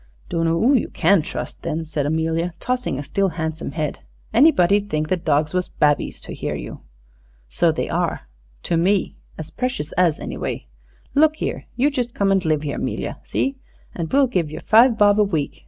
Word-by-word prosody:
"Dunno 165 0 +1
oo 235 +11 +3
you 255 - +1
can 180 +2 +3
trust - - -6
then," 165 0 -3
said 150 -2 -2
Amelia, 165 +2 -1
tossing 250 - -2
a 145 - -4
still 195 +6 0
handsome 160 -2 -4
head. 155 -3 -3 0.3
"Anybody 215 - +5
'ud 205 0 -5
think 155 -2 -1
the - - +3
dogs 155 -3 0
was 180 0 0
babbies, 145 -1 +1
to - - -8
hear - - -3
you." - - -7 0.7
"So - - +2
they - - -2
are - - -2 0.4
to 170 - 0
me 190 +3 +1 0.2
as 160 -1 -7
precious 245 - -3
as, 170 -4 +2
anyway. - - -4 0.5
Look 310 +2 +4
here, - - -4
you 280 +4 +2
just 245 -4 -3
come 200 -1 +2
and 195 -1 +2
live 155 -2 0
'ere, 145 - -3
'Melia - - -3
see? 270 0 -2 0.4
An' 165 -2 -3
we'll 275 +1 +5
give 180 - -1
yer 155 - -7
five 230 +1 +5
bob 205 0 +5
a - - +6
week. 160 -8 -2
175 Hz, 190 wpm, -21 LUFS, 155-220 Hz, 0.7 s, a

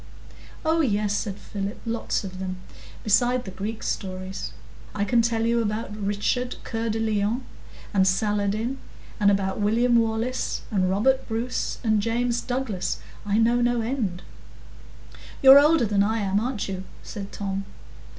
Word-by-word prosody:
"Oh 325 +1 +3
yes," 210 -6 +1
said 200 -3 -2
Philip; 200 +2 -5
"lots 230 -1 -1
of 185 -1 -7
them, 185 -1 -4 0.5
besides 245 +4 +3
the 190 - -6
Greek 210 +4 -5
stories. 185 0 -4 0.4
I 200 -1 0
can 235 +2 +3
tell 230 -1 +1
you 235 0 +2
about 215 -1 -2
Richard 210 +5 -1
Cœur 225 0 -2
de 225 - -2
Lion 220 +2 0 0.5
and 190 -2 +4
Saladin, 210 +5 0 0.4
and 205 -1 +5
about 195 -1 +1
William 235 +4 +3
Wallace 225 +2 0
and 185 -3 +2
Robert 260 +8 +2
Bruce 230 +2 -2
and 215 -2 +3
James 235 +2 0
Douglas,—I 215 -4 -3
know 235 +2 +3
no 240 -1 +2
end." 220 -7 -2 1.2
"You're 270 +1 +11
older 300 -3 +4
than 205 -1 +2
I 220 +3 +2
am, 195 0 +1
aren't 235 -1 -2
you?" 190 -1 -4 0.2
said 200 -2 -7
Tom. 195 -1 -3
220 Hz, 145 wpm, -25 LUFS, 200-240 Hz, 1.2 s, You're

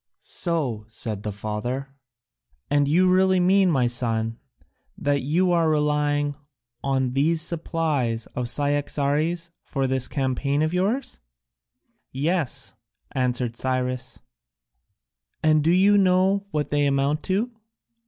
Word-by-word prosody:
"So," 135 - -2
said 110 -2 -5
the 105 - -4
father, 120 +7 -4 0.8
"and 145 -1 +3
you 175 +6 +3
really 185 0 +4
mean, 190 +1 +4
my 135 -7 +2
son, 115 -2 0 0.6
that 145 -1 0
you 175 +7 +1
are 165 -2 +3
relying 150 -1 +1
only 145 0 -5 0.6
on 130 -1 -1
these 155 +4 +2
supplies 155 -9 -1
of 125 -1 -2
Cyaxares 145 +4 +1
for 135 -2 -2
this 130 -1 0
campaign 140 +2 -1
of 155 +2 -1
yours?" 205 +9 -1 0.9
"Yes," 145 -1 -1 0.4
answered 125 -3 -1
Cyrus. 130 0 -2 1.2
"And 155 -1 +4
do 160 - +2
you 195 +4 +5
know 190 +1 +2
what 150 -5 -2
they 145 -1 +2
amount 140 +2 +1
to?" 205 +6 0
145 Hz, 120 wpm, -24 LUFS, 130-170 Hz, 1.2 s, you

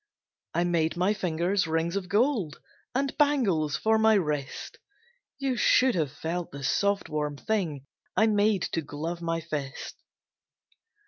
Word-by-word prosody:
I 170 - +3
made 170 -2 +1
my 185 +4 +2
fingers 180 0 0
rings 165 +2 0
of 190 -2 -3
gold, 210 - +1 0.4
And 275 +1 0
bangles 205 - +2
for 220 0 +2
my 220 0 +5
wrist; 150 -7 -2 0.6
You 270 -2 -1
should 255 +1 +4
have 155 -8 0
felt 165 +3 -4
the 140 0 -8
soft, 200 +8 +1
warm 150 -1 -2
thing 165 - -2 0.3
I 220 - +6
made 210 -3 +2
to 165 - +1
glove 160 +4 -5
my 165 0 -1
fist. 145 -4 -5
175 Hz, 140 wpm, -28 LUFS, 155-215 Hz, 0.6 s, I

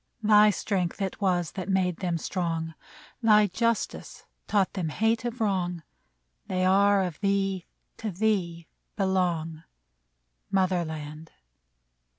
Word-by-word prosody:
Thy 210 0 +6
strength 190 -1 -1
it 195 +2 -3
was 175 -4 +1
that 185 0 -6
made 185 -3 +1
them 175 -3 -1
strong; 165 -1 -3 0.5
Thy 215 -2 +6
justice 230 +3 -2 0.2
taught 200 -3 +1
them 180 -5 -2
hate 225 +8 0
of 240 +1 -4
wrong; 180 -6 -1 0.6
They 185 0 0
are 200 +1 +4
of 175 -5 -5
thee, 195 -2 0 0.3
to 220 - -4
thee 180 -4 -1 0.3
belong, 175 -5 0 0.9
Mother 185 -2 +1
land. 155 0 -7
185 Hz, 120 wpm, -27 LUFS, 170-205 Hz, 0.9 s, Thy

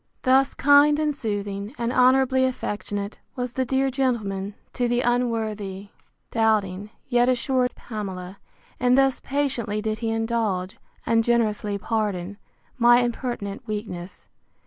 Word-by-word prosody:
Thus 265 +1 +3
kind 290 +1 +5
and 300 -1 0
soothing, 205 -1 -4
and 235 +1 -1
honourably 260 +1 +4
affectionate, 205 -5 -3 0.2
was 250 -2 -3
the 260 0 0
dear 265 +1 +1
gentleman, 210 -7 -1 0.2
to 245 -1 0
the 240 +1 +1
unworthy, 220 -5 -1 0.4
doubting, 210 -3 +1 0.2
yet 245 -1 +3
assured 255 0 +1
Pamela; 195 -4 -6 0.4
and 250 +1 +4
thus 270 -1 +3
patiently 260 -7 -1
did 215 0 -2
he 225 -1 -2
indulge, 225 -5 -1 0.3
and 225 0 +3
generously 215 -3 +1
pardon, 205 -3 -2 0.4
my 240 +1 +6
impertinent 240 -2 -4
weakness. 205 -4 -6
230 Hz, 125 wpm, -24 LUFS, 205-255 Hz, 0.4 s, my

